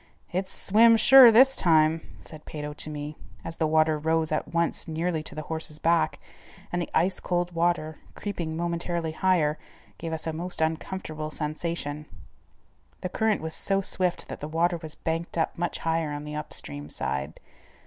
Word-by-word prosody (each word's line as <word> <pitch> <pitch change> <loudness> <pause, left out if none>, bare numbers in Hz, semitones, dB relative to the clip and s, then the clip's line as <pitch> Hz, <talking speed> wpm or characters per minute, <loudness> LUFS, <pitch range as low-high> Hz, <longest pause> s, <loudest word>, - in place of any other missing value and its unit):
"It's 185 +1 -2
swim 225 +3 +5
sure 255 +1 +9
this 265 +4 +6
time," 160 -2 +4 0.2
said 155 -1 -12
Peyto 150 -1 -6
to 150 - -5
me, 150 0 -6 0.3
as 165 - -6
the 160 - +1
water 155 0 +3
rose 160 +1 0
at 155 - -1
once 170 +1 0
nearly 165 0 -1
to - - -9
the 155 - -4
horse's 160 -1 -4
back, 160 0 +1 0.5
and 175 - -1
the 170 - -4
ice 185 +2 +2
cold 175 0 -1
water, 165 -2 0 0.2
creeping 170 -6 -4
momentarily 170 -1 -2
higher, 160 -3 +1 0.4
gave 165 0 -4
us 160 -1 -3
a 160 - -2
most 175 +3 -3
uncomfortable 160 -1 -2
sensation. 150 -1 -4 0.9
The 185 - -3
current 220 +2 +1
was 160 0 -4
so 195 +3 0
swift 185 -2 -1
that - - -6
the 150 - -5
water 170 +3 +1
was 160 -2 -8
banked 165 +1 -3
up 165 - 0
much 175 0 -2
higher 165 -2 -1
on 145 0 -5
the 150 0 -6
upstream 75 - -5
side. 70 +2 -4
160 Hz, 170 wpm, -27 LUFS, 155-175 Hz, 0.9 s, sure